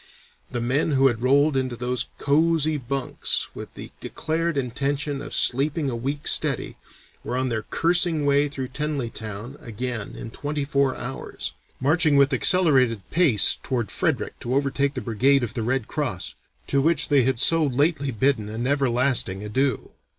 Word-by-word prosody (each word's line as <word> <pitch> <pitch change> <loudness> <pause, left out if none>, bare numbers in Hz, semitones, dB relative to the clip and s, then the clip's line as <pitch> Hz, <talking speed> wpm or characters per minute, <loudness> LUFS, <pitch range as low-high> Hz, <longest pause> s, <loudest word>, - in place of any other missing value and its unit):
"The 120 - -3
men 135 +6 +1
who 135 0 +3
had 115 -2 -4
rolled 140 +3 +3
into 130 -2 -1
those 125 +1 -2
cosy 155 +1 +2
bunks 135 -1 -2
with - - -9
the - - -9
declared 165 0 -2
intention 140 +2 -2
of - - -8
'sleeping 140 +2 +1
a - - -3
week 140 +5 -4
steady,' - - +1 0.5
were 125 - -3
on 130 0 0
their 110 -2 -1
cursing 165 +3 +1
way 145 +1 +3
through 135 -3 -5
Tenallytown 125 -4 -4
again 120 -1 -5
in 115 - -8
twenty 145 +2 -3
four 140 -2 +1
hours, 135 +2 -6 0.3
marching 150 +2 +2
with 140 0 +4
accelerated 130 - +3
pace 160 - +3
toward 120 -4 -2
Frederick - - -1
to 120 +2 -3
overtake 140 0 0
the 130 - -3
brigade 125 +5 +2
of 115 -2 -4
the 120 - -3
red 125 +1 -1
cross, 100 - -3 0.3
to 140 - +1
which 165 +4 +2
they 145 -2 +5
had 130 -1 0
so 165 +4 +3
lately 140 +1 +1
bidden 120 -2 0
an 115 +3 -4
everlasting 130 -7 +1
adieu. 130 +4 -1
135 Hz, 160 wpm, -24 LUFS, 120-145 Hz, 0.5 s, they